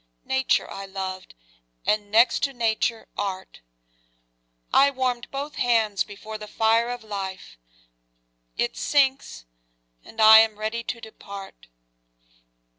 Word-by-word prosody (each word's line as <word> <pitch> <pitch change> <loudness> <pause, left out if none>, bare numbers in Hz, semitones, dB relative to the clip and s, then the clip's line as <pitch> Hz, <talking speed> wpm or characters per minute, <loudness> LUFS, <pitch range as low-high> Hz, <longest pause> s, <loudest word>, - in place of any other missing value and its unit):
Nature 265 0 +1
I 195 0 -8
loved 190 - -6 0.5
and, 210 -1 0
next 225 +4 +4
to 275 -1 0
Nature, 230 -1 -1
Art: 190 - -5 1.1
I 280 +1 +6
warm'd 255 -3 -2
both 280 +2 -6
hands 220 -4 +2
before 215 +1 -9
the 210 - -8
fire 225 +2 +2
of 245 -1 -5
life; 195 - -6 1.0
It 120 - -1
sinks, 265 - 0 0.6
and 225 - -14
I 220 0 +10
am 220 -1 +2
ready 220 +2 -3
to 235 - -4
depart. 200 -3 -11
220 Hz, 115 wpm, -24 LUFS, 200-245 Hz, 1.1 s, I